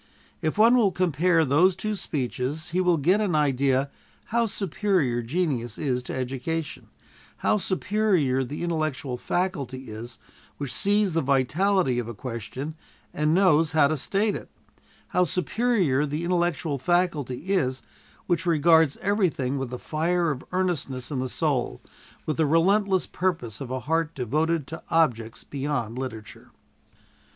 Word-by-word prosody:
If 155 +4 -1
one 230 +3 +6
will 220 -6 +4
compare 170 -1 +2
those 165 +7 +4
two 215 +3 -3
speeches 145 - -3
he 180 +2 +1
will 180 -2 +3
get 180 +9 +3
an 190 -6 0
idea 140 -2 +2 0.4
how 235 -1 +3
superior 185 - 0
genius 120 -4 -2
is 130 -4 -1
to 125 - -6
education; 135 +5 -3 0.6
how - - +4
superior 185 -9 +1
that 130 +3 -6
intellectual 155 -6 -2
faculty 135 - -3
is 115 +2 -8 0.4
which 140 -3 -3
sees 205 -2 +2
the 165 - +2
vitality 140 +2 +2
of 120 - -4
a 120 - -6
question 125 +6 -5 0.4
and 150 +2 +1
knows 165 -5 +4
how 155 -3 +5
to 155 - +1
state 200 +8 0
it; - - -8 0.6
how 180 - +3
superior 180 - +1
that 150 +2 -3
intellectual 170 -4 0
faculty 170 -3 0
is 130 -9 0 0.4
which 180 0 0
regards 160 -2 +4
everything 170 -10 0
with 135 -2 -3
the 125 - -5
fire 165 +4 0
of 135 -3 -5
earnestness 160 -9 -2
in 135 - -2
the 130 0 -2
soul, 130 - -1 0.5
with 155 - -2
the 160 -2 +2
relentless 190 +4 +3
purpose 160 - -2
of 135 - -5
a 130 0 -3
heart 165 +3 -1
devoted 155 +5 0
to 160 +4 -8
objects 115 -9 +1
beyond 135 -5 -3
literature. 115 -5 -7
155 Hz, 145 wpm, -25 LUFS, 130-180 Hz, 0.6 s, one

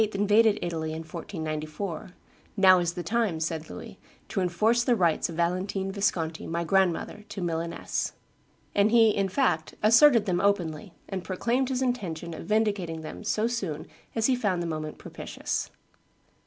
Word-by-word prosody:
invaded 210 +2 +4
Italy 160 -2 -3
in 160 +1 -5
1494, 160 +1 -5 0.4
"Now 185 -2 +7
is 175 -1 -1
the 175 - -5
time," 210 -3 0
said 160 0 -3
Louis, - - -9 0.3
"to 195 - -1
enforce 215 +7 +2
the 245 -1 +3
rights 170 -4 +2
of 165 - -6
Valentine 190 +3 -1
Visconti, 180 -5 -1
my 170 +1 -1
grandmother, 190 +3 +1
to 205 - -6
Milaness." 170 -1 -2 0.6
And 205 +1 +4
he, 225 -1 +6
in 195 -2 0
fact, 185 - 0
asserted 230 +1 +6
them 180 -3 +1
openly, 180 -3 0
and 190 -2 -4
proclaimed 235 +8 0
his 260 0 0
intention 175 -10 -2
of 165 - -8
vindicating 200 -7 0
them 155 - -8
so 215 +1 0
soon 195 -11 -3 0.3
as 225 -1 +1
he 260 - +4
found 195 -8 0
the - - -3
moment 155 -2 -4
propitious. - - -4
185 Hz, 155 wpm, -27 LUFS, 165-215 Hz, 0.6 s, Now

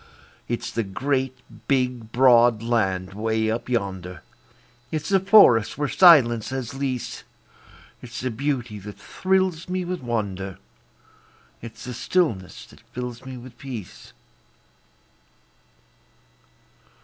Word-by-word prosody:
It's 120 - -3
the 115 - -1
great, 130 +5 -2 0.3
big, 125 -4 0
broad 120 -3 +5
land 95 -6 0
'way 110 +1 0
up 115 +2 -4
yonder, 95 -6 -3 0.7
It's 155 -2 -3
the 195 -1 +4
forests 190 - +5
where 145 0 0
silence 135 - +6
has 130 -2 -4
lease; 135 -2 -4 0.8
It's 120 -1 -8
the 130 0 -2
beauty 120 -3 -3
that 105 +1 -10
thrills 185 -3 -1
me 185 0 -2
with 180 -2 -4
wonder, 100 -6 -3 1.0
It's 115 -1 -10
the 125 - -6
stillness 115 - -1
that - - -18
fills 125 0 -8
me 130 -1 -7
with 125 0 -13
peace. 125 -8 -9
120 Hz, 115 wpm, -24 LUFS, 110-135 Hz, 1.0 s, silence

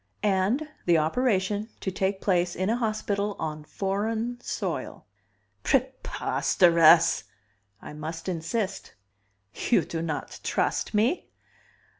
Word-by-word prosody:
"And 210 +9 +1 0.2
the 170 -1 +5
operation 205 +4 +1
to 190 - -3
take 190 +1 -1
place 175 -2 +1
in 185 +4 0
a - - +2
hospital 210 -3 -1
on 155 -1 -4
foreign 220 +7 -2
soil." - - -4 0.6
"Preposterous." 165 - +3 0.6
"I - - -8
must 160 +3 -6
insist." 185 +4 -3 0.7
"You 240 - +4
do 165 - -4
not 155 -3 -4
trust - - -1
me?" 235 - +1
190 Hz, 105 wpm, -27 LUFS, 165-215 Hz, 0.7 s, the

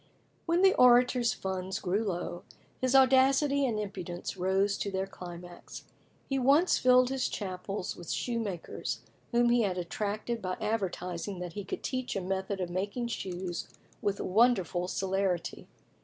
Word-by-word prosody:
When 340 +3 +2
the 385 - +7
Orator's 245 -1 +5
funds 190 0 -3
grew 200 +4 0
low, 175 -3 -3 0.4
his 255 0 +1
audacity 270 +1 +5
and 220 -3 -1
impudence 185 -4 -5
rose 190 +2 +1
to 200 - -2
their 190 0 -1
climax. 175 -2 -10 0.4
He 270 -1 0
once 285 +8 +4
filled 255 0 +5
his 265 -1 0
chapel 190 -1 -4
with 175 -2 -10
shoemakers, 225 -8 -3 0.3
whom 240 0 +3
he 240 0 +4
had 190 -4 0
attracted 210 +6 -3
by 185 -1 -3
advertising 195 -3 -3
that 175 -2 -5
he 205 - -5
could 190 - -6
teach 255 -3 -3
a 195 - -1
method 190 +1 -2
of 180 -2 -3
making 200 +6 -2
shoes 180 -5 -4 0.3
with 200 -1 -1
wonderful 190 -4 +2
celerity. 190 -2 -1
200 Hz, 145 wpm, -30 LUFS, 185-245 Hz, 0.4 s, the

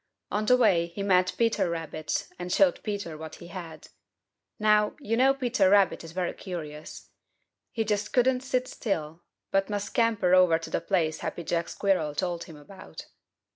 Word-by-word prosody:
On 210 +1 -1
the 250 - +6
way 190 -8 +3
he 185 +4 -6
met 185 -2 +2
Peter 230 -6 +1
Rabbit 160 -2 -3
and 180 0 -5
showed 185 -1 +3
Peter 200 -6 -4
what 155 0 -8
he 170 - -12
had. 170 -4 -9 0.7
Now, 210 0 +3
you 230 -6 -1
know 265 +3 +4
Peter 245 -7 +2
Rabbit 200 -3 +3
is 165 - -9
very 180 0 -2
curious. 155 -5 -8 0.6
He 225 - -1
just 210 -1 -1
couldn't 250 0 +3
sit 255 -1 -1
still, 165 -9 -4 0.3
but 195 +1 +1
must 205 -1 -2
scamper 220 -6 +1
over 180 -3 +6
to 165 - -9
the - - -1
place 165 -5 0
Happy 170 - -5
Jack 170 +1 -1
Squirrel 180 -7 0
told 175 0 -2
him 160 - -12
about. 185 +6 -12
185 Hz, 175 wpm, -27 LUFS, 170-215 Hz, 0.7 s, the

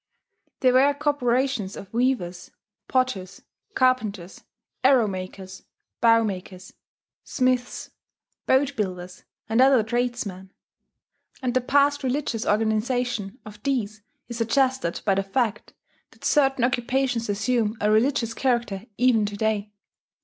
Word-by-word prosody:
There 255 -1 +4
were 275 +3 +4
corporations 260 -7 0
of 195 - -11
weavers, 230 -8 -1 0.4
potters, 255 -8 -1 0.3
carpenters, 215 -8 0 0.4
arrow 260 -3 +5
makers, 190 -1 -7 0.4
bow 230 0 +5
makers, 185 -2 -6 0.5
smiths, 255 -1 -1 0.6
boat 275 +1 +2
builders, 180 -4 -5 0.2
and 225 +3 +2
other 260 -3 +5
tradesmen; 225 -5 -3 0.9
and 250 -1 0
the 255 - +2
past 285 +2 +2
religious 255 -3 -2
organization 220 0 0
of 210 -1 -12
these 215 -6 -2 0.3
is 235 -1 -6
suggested 255 -5 +1
by 200 - +3
the 195 - +1
fact 215 +3 -2 0.3
that - - -14
certain 270 -4 +2
occupations 245 -1 0
assume 220 +1 0
a 210 +1 +2
religious 230 +1 +2
character 235 -6 -1
even 245 -3 +3
to 205 0 -6
day. 215 -1 -1
235 Hz, 115 wpm, -24 LUFS, 205-255 Hz, 0.9 s, arrow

